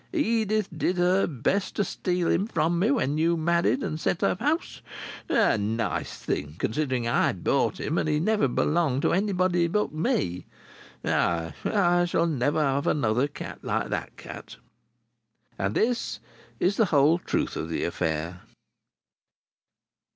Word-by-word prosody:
Edith 220 - +1
did 180 - 0
her 180 +2 +3
best 165 - -1
to 205 - +1
steal 180 -1 -1
him 200 - +1
from 170 -5 0
me 205 +6 +2
when 155 - +1
you 170 +1 +2
married 170 - +1
and 155 - -3
set 165 - -1
up 180 - +1
house. 310 +4 -1 0.5
A - - +3
nice 110 +2 -2
thing 75 +1 -3
considering 130 0 -1
I 120 - +2
bought - - 0
him 160 - -1
and - - -1
he 150 0 +2
never 210 -1 +2
belonged 145 +1 +1
to - - +2
anybody 185 -2 +1
but 210 +2 -1
me! 90 - -1 0.6
Ay! 85 -2 0
I 175 -4 +3
shall 170 -1 +1
never 150 -1 +1
have 140 0 0
another 125 -1 +2
cat 145 - -8
like - - -2
that - - -4
cat." - - -10 1.0
And 95 +2 -1
this 240 +1 0 0.4
is 195 +3 +1
the 225 - +4
whole 155 0 +4
truth - - -2
of 80 - -4
the 80 - -2
affair. 85 +1 -2
165 Hz, 150 wpm, -26 LUFS, 125-185 Hz, 1.0 s, the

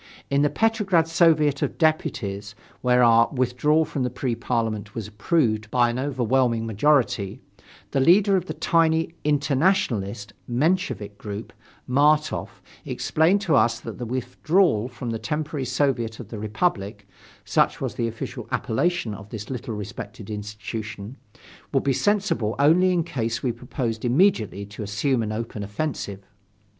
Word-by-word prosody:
In 140 0 +3
the 145 - +3
Petrograd 205 -7 +2
Soviet 155 -4 +3
of - - -2
Deputies, 105 - -1 0.3
where 125 0 +4
our 115 0 +5
withdrawal 140 +5 +2
from 140 - -4
the 125 - 0
Pre 125 0 -2
Parliament 115 -3 -2
was 115 -3 -4
approved 110 -1 0
by 120 0 +3
an 120 - -3
overwhelming 130 -3 +1
majority, 115 -3 +1 0.5
the 135 - +1
leader 195 +8 +5
of 185 -1 -1
the - - -5
tiny 165 -1 +2
"internationalist" 135 - +1 0.2
Menshevik 125 - 0
group, 105 +1 -7 0.3
Martof, 150 +4 +2 0.3
explained 170 +6 +1
to 170 -5 0
us 115 -1 +3
that - - -8
the 120 - -3
withdrawal 130 - +1
from 120 -1 -6
the 115 - -3
temporary 150 +2 -3
Soviet 120 -6 0
of 120 - -9
the 110 - -6
Republic 105 - -2 0.4
(such - - +2
was - - -3
the 115 - -1
official 115 0 -6
appellation 120 -2 0
of 100 0 -10
this 110 +2 -7
little 125 -2 -4
respected 105 +1 -7
institution) 105 +1 -6 0.6
would - - +1
be 140 - +2
sensible 185 - +1
only 170 +6 +4
in 175 -2 +1
case 120 -7 -3
we 125 - +1
proposed 120 -1 -4
immediately 120 - +2
to 105 +2 -10
assume 105 +5 0
an 110 -1 -2
open 110 -1 -4
offensive. 100 -2 -4
125 Hz, 145 wpm, -24 LUFS, 110-155 Hz, 0.6 s, our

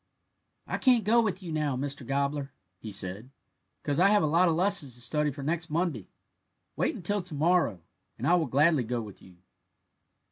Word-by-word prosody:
"I - - -3
can't 250 -4 +4
go 230 +4 +4
with 195 -3 -2
you 170 - -6
now, 150 -4 -1
Mr. 140 0 -4
Gobbler," 140 0 -1 0.3
he 110 - -8
said, 100 +4 -4 0.5
"because 145 0 -1
I 185 - +6
have 210 -3 +4
a - - +3
lot 170 +4 +3
of 160 - +1
lessons 180 - +1
to - - -8
study 150 +5 0
for 140 0 -7
next 165 +3 -2
Monday; 155 - -2 0.7
wait - - 0
until 205 +3 -2
to 175 -3 -8
morrow, 155 - +1 0.3
and - - -4
I 175 - +4
will 170 -4 +2
gladly 145 +2 +3
go 120 +1 -2
with 105 -4 -9
you." 90 -2 -17
150 Hz, 190 wpm, -28 LUFS, 130-180 Hz, 0.7 s, I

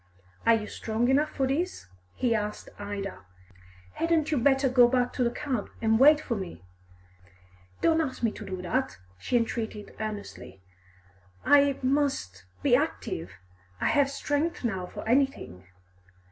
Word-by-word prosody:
"Are 230 - +7
you 215 -1 -3
strong 225 +3 -1
enough 290 +3 +3
for 270 - -1
this?" 295 - -2 0.3
he 245 -2 +1
asked 210 -1 -3
Ida. 200 -1 -5 0.7
"Hadn't 325 -2 +1
you 295 - +2
better 270 +2 +3
go 250 -1 +6
back 245 0 +1
to 250 - 0
the 235 - +2
cab 255 -3 -3
and 220 0 +2
wait 295 +3 +7
for 275 - -3
me!" 185 - -7 1.2
"Don't 325 0 +3
ask 260 -5 -4
me 230 - +3
to - - -9
do 185 -1 -6
that!" 260 +9 -1 0.2
she 245 - +1
entreated 225 -2 -3
earnestly. 210 - -6 0.9
"I 285 -1 +5
must 255 - 0 0.2
be - - +5
active. 85 +4 -2 0.5
I - - +1
have 285 -1 +3
strength 290 +3 -2
now 190 -6 -2
for - - -8
anything." 240 - 0
245 Hz, 145 wpm, -28 LUFS, 210-280 Hz, 1.2 s, Are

